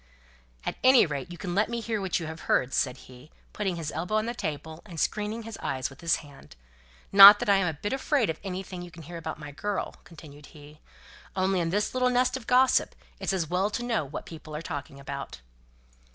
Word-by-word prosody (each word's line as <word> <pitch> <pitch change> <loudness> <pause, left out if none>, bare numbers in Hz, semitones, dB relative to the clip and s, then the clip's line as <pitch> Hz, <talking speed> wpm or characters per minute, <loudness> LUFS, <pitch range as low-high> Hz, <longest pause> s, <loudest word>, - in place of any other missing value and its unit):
"At - - -3
any 260 -3 +7
rate, 150 +2 -5
you 175 - -8
can 180 -1 -4
let 205 +4 +2
me 235 0 -2
hear 225 -2 -2
what 190 -2 -1
you've 160 -1 -6
heard," 130 -3 +1
said 130 -1 0
he, 125 +3 -15 0.2
putting 195 -4 -2
his 160 -3 -4
elbow 180 +6 -3
on 215 0 +1
the 235 - -2
table, 160 -5 -5
and 170 -6 -9
screening 210 +6 -1
his 225 -1 -8
eyes 130 0 -2
with 135 - -14
his 165 -1 +3
hand. 135 - -15 0.6
"Not 200 +1 +12
that - - -4
I'm 195 -2 +3
a 160 - -1
bit 205 - -3
afraid 270 -3 +1
of 160 - -3
anything 185 -1 -5
you 175 - -8
can 165 -1 -12
hear 170 +3 -8
about 165 - -5
my 150 -1 -9
girl," 205 +8 -4
continued 150 -3 -13
he. 150 0 -15 0.6
"Only 190 0 +1
in 165 -1 0
this 205 +4 0
little 255 0 +2
nest 250 +1 +2
of 260 -4 -7
gossip, 255 +1 +3 0.2
it's - - -1
as 180 -4 -1
well 185 +5 0
to 235 - -4
know 230 -8 0
what 140 +1 -7
people 155 -2 -9
are 155 - -5
talking 140 -2 -6
about." 140 - -7
175 Hz, 220 wpm, -27 LUFS, 150-210 Hz, 0.6 s, Not